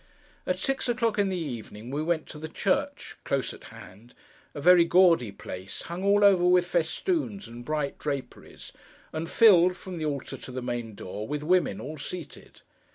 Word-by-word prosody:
At 180 - 0
six 270 +5 -1
o'clock 230 -3 0
in 200 -1 +2
the 185 - -2
evening 120 -6 -6
we 145 +2 -2
went 160 0 0
to 150 - -9
the 160 - -5
church—close - - -2
at - - -13
hand—a 115 +8 -14
very 175 +3 +7
gaudy 170 - +4
place, 95 -1 -8
hung 175 +2 -6
all 200 +1 +4
over 195 -3 +6
with 180 0 +4
festoons 200 - -1
and 120 +1 -10
bright 150 +1 -2
draperies, 140 -3 -6 0.4
and 160 +1 -4
filled, 180 -5 +6
from 185 -3 -7
the 155 - -2
altar 140 -3 -4
to - - -10
the 125 0 -5
main 120 -3 -4
door, 105 +3 -6
with 150 0 -3
women, 175 - +2
all 150 +7 -7
seated. 170 +2 -9
160 Hz, 170 wpm, -27 LUFS, 130-185 Hz, 0.4 s, very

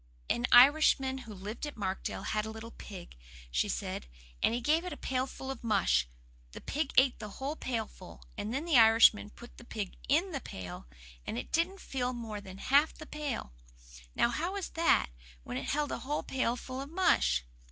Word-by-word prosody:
"An 240 +1 +1
Irishman 265 0 +6
who - - -7
lived 210 +9 -5
at 295 - -8
Markdale 195 -2 -3
had 215 0 -1
a 220 - -5
little 220 +1 -8
pig," 185 - -10 0.4
she - - +1
said, - - -3 0.3
"and - - +3
he 235 - 0
gave 305 +7 +2
it 360 - -5
a 295 - -6
pailful 265 +1 -3
of 265 - -8
mush. 195 - +2 0.5
The - - -7
pig 295 -1 -2
ate 260 0 +5
the 215 - -6
whole 280 +3 -3
pailful, 220 - -5
and 205 +2 -4
then 275 +6 -2
the 315 -8 +5
Irishman 225 -2 +6
put 240 +3 -14
the - - -12
pig 210 -5 -5
IN 335 +7 +3
the 275 -5 -3
pail, 90 -9 -8 0.4
and 110 - -3
it 120 - -5
didn't 360 +4 0
fill 255 -1 -2
more 225 -4 -5
than 190 -1 -10
half 285 +9 +3
the 310 - -10
pail. 295 - -4 0.6
Now, - - +3
how 330 +10 -2
was 400 -3 -4
that, 330 - +2 0.3
when 125 - -5
it 130 - -4
held 295 0 0
a - - -3
whole 290 +3 -2
pailful 255 0 -2
of 275 - -7
mush?" 65 - +2
245 Hz, 195 wpm, -31 LUFS, 210-290 Hz, 0.6 s, Irishman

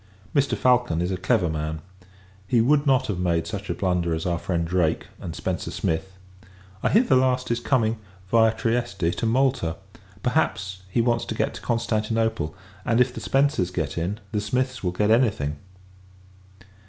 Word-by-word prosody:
Mr. 140 -1 +2
Falcon 125 -9 +3
is 90 +2 -1
a - - 0
clever 90 -1 +1
man. 80 0 -3 0.7
He 120 +1 +3
would 145 +5 +3
not 130 -2 +4
have 95 -4 -3
made 85 -2 +1
such 100 -1 -6
a 85 - -1
blunder 90 -3 0
as 80 - -4
our 85 -1 0
friend 85 -2 -1
Drake, 85 -2 +1
and 85 - -6
Spencer 90 +1 -3
Smith. 80 +4 -2 0.7
I - - +2
hear, 225 - +5
the 140 - +3
last 130 -1 +2
is 120 - +1
coming, 115 -3 +1 0.3
viâ 110 -1 +4
Trieste, 115 -7 0
to - - -2
Malta. 120 -9 +1 0.5
Perhaps, 95 0 0
he 115 - +1
wants 120 0 +1
to - - -4
get - - 0
to - - -9
Constantinople; 110 -6 -1 0.3
and, 115 - +1
if 125 0 +3
the - - -7
Spencers 135 -10 +2
get 80 -6 -3
in, 90 +6 -2
the 105 -2 0
Smiths 130 +4 -1
will 90 - +1
get 105 +4 +1
any 120 +1 +5
thing. 75 -6 -4
105 Hz, 180 wpm, -24 LUFS, 85-120 Hz, 0.7 s, hear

